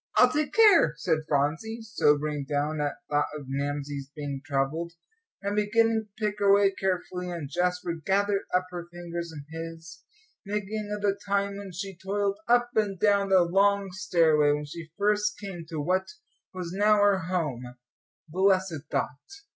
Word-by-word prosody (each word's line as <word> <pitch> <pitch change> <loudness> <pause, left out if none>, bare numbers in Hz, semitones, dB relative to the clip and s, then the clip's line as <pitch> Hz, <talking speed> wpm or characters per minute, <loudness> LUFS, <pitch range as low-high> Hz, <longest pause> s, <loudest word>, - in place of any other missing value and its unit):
"I'll - - +7
take 300 -1 0
care," 395 - +6
said 160 -1 +1
Phronsie, 160 +11 0
sobering 150 -9 +1
down 150 +1 0
at 145 -1 -1
thought 145 0 +1
of 145 - -9
Mamsie's 140 0 -3
being 140 -3 -5
troubled, 155 +3 -1 0.5
and 200 +1 -1
beginning 220 +1 +2
to 220 - -2
pick 210 0 -2
her 200 -1 +4
way 200 0 +5
carefully. 180 -1 -2
And 170 -5 -5
Jasper 180 +2 -1
gathered 200 +2 +1
up 180 0 +2
her 175 -1 -6
fingers 170 -1 -6
in 145 -3 -9
his, 165 0 -8 0.4
thinking 210 +1 -3
of 210 0 -4
the 200 -1 +1
time 200 0 0
when 200 -1 -8
she 195 +2 -6
toiled 200 +2 -2
up 240 0 +3
and 205 -4 0
down 200 -2 +3
the 190 -2 +6
long 195 +2 +2
stairway, 165 -6 +3
when 150 0 -1
she 160 +2 -9
first 210 0 +1
came 185 -5 -7
to 160 -3 -4
what 185 +5 0 0.4
was 180 -2 -6
now 210 +2 +4
her 205 -2 +4
home, 135 -9 -3 0.5
blessed 185 -2 +1
thought! 145 -1 -3
180 Hz, 165 wpm, -27 LUFS, 155-200 Hz, 0.5 s, I'll